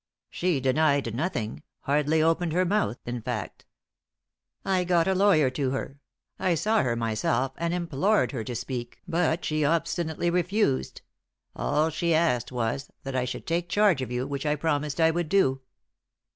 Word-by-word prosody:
"She 175 -5 0
denied 135 -2 +2
nothing 120 - -3 0.2
hardly 150 +2 +2
opened 165 0 +1
her 180 +2 +2
mouth, 175 - 0
in 120 0 -4
fact. 110 -3 -5 1.0
I 185 -2 +2
got 175 -1 +2
a 190 - +3
lawyer 185 -8 +4
to 135 0 -1
her 135 +1 -4 0.4
I 180 -2 +2
saw 215 +7 +2
her 120 -2 0
myself 115 +3 0
and 170 0 -1
implored 175 +4 +1
her 120 -6 -4
to 125 - -4
speak 120 0 -5
but 165 0 0
she 155 0 0
obstinately 165 +2 0
refused. 180 -4 0 0.5
All 155 +2 +1
she 165 +1 +1
asked 130 -8 +1
was, 125 +3 -2
that 135 -1 -5
I 125 -1 +1
should 125 0 -5
take 170 +1 -1
charge 205 -9 +3
of 130 - -4
you, 125 +1 -1
which 140 +1 -3
I 150 - +2
promised 150 -1 -1
I 160 0 +5
would 170 -1 -2
do." 135 -9 +2
155 Hz, 165 wpm, -27 LUFS, 130-170 Hz, 1.0 s, I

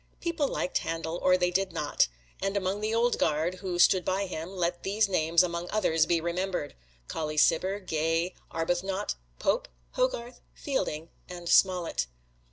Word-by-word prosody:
People 335 -4 0
liked 180 - -1
Handel, 165 +1 -3
or 185 0 +5
they 180 0 +1
did 195 +1 0
not, 145 - +1 0.3
and 195 +1 0
among 195 +1 -1
the 215 +1 -1
Old 235 +2 +2
Guard 165 +5 +1
who 180 -2 -3
stood 180 +1 +5
by 190 +3 0
him, 165 -2 -5
let 175 -1 -1
these 205 +2 +1
names, 170 -2 +3
among 170 0 -3
others, 165 -7 +2
be 170 -1 +3
remembered: 175 -1 -2 0.3
Colley 155 -1 -3
Cibber, 185 +6 +3
Gay, 165 0 0 0.2
Arbuthnot, 175 +4 -1 0.2
Pope, - - +1 0.2
Hogarth, 250 - -1
Fielding 165 - -2 0.2
and 175 -1 -7
Smollett. 180 - +3
180 Hz, 155 wpm, -29 LUFS, 165-195 Hz, 0.3 s, or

